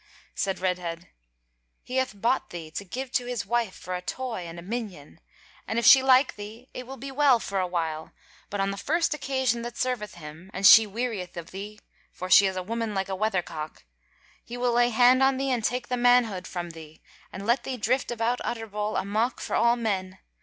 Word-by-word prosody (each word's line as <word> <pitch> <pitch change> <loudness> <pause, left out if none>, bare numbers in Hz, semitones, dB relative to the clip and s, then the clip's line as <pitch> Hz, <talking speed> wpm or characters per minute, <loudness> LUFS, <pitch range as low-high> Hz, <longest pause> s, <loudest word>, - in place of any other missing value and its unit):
Said 195 -1 -1
Redhead; 180 -2 -3 0.7
"He 255 - -4
hath 260 -6 -1
bought 235 +5 +1
thee 165 -3 -8
to 200 - -5
give 250 +7 -6
to 245 - 0
his 245 -2 -3
wife 230 -2 -1
for 185 - -7
a 180 - -3
toy 225 -3 -4
and 165 +1 -9
a 170 - -8
minion, 195 - -6 0.5
and 225 - -2
if 235 - +1
she 265 +3 +9
like 260 +1 +4
thee, 215 +5 -9
it 250 -1 -7
will 270 +1 -8
be 275 0 -7
well 270 -3 +4
for 195 -3 -3
a 185 - 0
while: 160 -3 -3 0.4
but 205 - -4
on 195 0 +1
the 200 - -6
first 325 - 0
occasion 260 -5 -1
that 240 0 -7
serveth 250 -5 -2
him, 160 +2 -11
and 195 +2 -1
she 220 +1 +9
wearieth 210 -5 -4
of 170 -1 -7
thee 205 +3 -7 0.3
(for 185 0 -7
she 200 +1 +8
is 190 - -3
a 185 - -3
woman 225 +1 -3
like 195 0 -2
a 190 - -2
weather 195 -2 0
cock), 155 -1 -8 0.6
he 240 - -8
will 245 -1 +1
lay 240 0 +4
hand 245 +2 +5
on 265 0 +4
thee 270 0 -1
and 240 -3 0
take 245 +2 -1
the 250 - -1
manhood 240 -6 +3
from 175 -2 -5
thee, 160 -1 -13 0.3
and 195 +1 -7
let 235 +4 +2
thee 260 -1 -4
drift 250 +4 0
about 240 +1 -1
Utterbol 215 -2 -3
a - - -4
mock 220 +5 0
for - - -3
all 235 0 +4
men. 195 -5 -2
220 Hz, 215 wpm, -26 LUFS, 185-245 Hz, 0.7 s, she